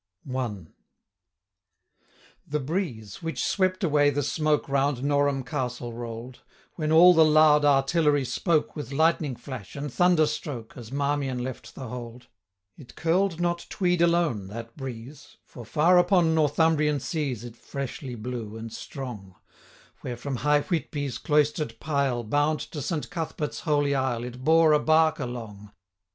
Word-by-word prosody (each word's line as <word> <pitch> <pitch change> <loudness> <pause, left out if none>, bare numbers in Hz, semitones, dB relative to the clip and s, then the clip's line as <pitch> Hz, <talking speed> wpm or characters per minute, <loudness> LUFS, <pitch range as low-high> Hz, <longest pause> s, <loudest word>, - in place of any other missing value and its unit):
1. 120 - -5 1.7
THE 150 +1 -1
breeze, 135 - -4
which 165 -7 -2
swept 185 0 0
away 145 -3 +4
the 145 0 -1
smoke 155 +1 0
Round 140 -1 0
Norham 145 -1 +1
Castle 125 -1 -4
roll'd, 120 +1 -7 0.3
When 155 -2 -2
all 175 +3 +8
the 160 -2 +6
loud 155 -1 +5
artillery 145 0 +3
spoke, 160 +4 0
With 150 -2 -6
lightning 155 -2 +1
flash, 120 -4 -9
and 140 -2 -5
thunder 175 -3 +4
stroke, 145 -6 -5
As 120 -2 -10
Marmion 140 -2 -1
left 130 0 -7
the 130 - -7
Hold, 120 +1 -8 0.5
5 - - -20
It 135 - -14
curl'd 170 +2 +1
not 175 0 -1
Tweed 180 -3 0
alone, 170 - +2
that 115 +3 -8
breeze, 130 +1 -9
For, 120 - -11
far 165 +9 +4
upon 175 -3 +3
Northumbrian 155 -1 +2
seas, 135 -6 -3
It 120 -1 -9
freshly 135 0 -6
blew, 110 -1 -6
and 115 0 -8
strong, 110 -9 -8 0.6
Where, 120 -1 -6
from 135 +1 -4
high 150 +3 +3
Whitby's 145 - -3
cloister'd 150 -5 0
pile, 140 -5 0
Bound 145 +7 +1
to 150 - -5
Saint 155 +4 -3
Cuthbert's 160 -4 -4
Holy 145 -3 +1
Isle, 130 -3 0
10 120 - -5
It 125 +1 -11
bore 160 +1 +5
a 150 - +5
bark 160 0 +3
along. 110 -6 -7
145 Hz, 150 wpm, -26 LUFS, 125-155 Hz, 1.7 s, all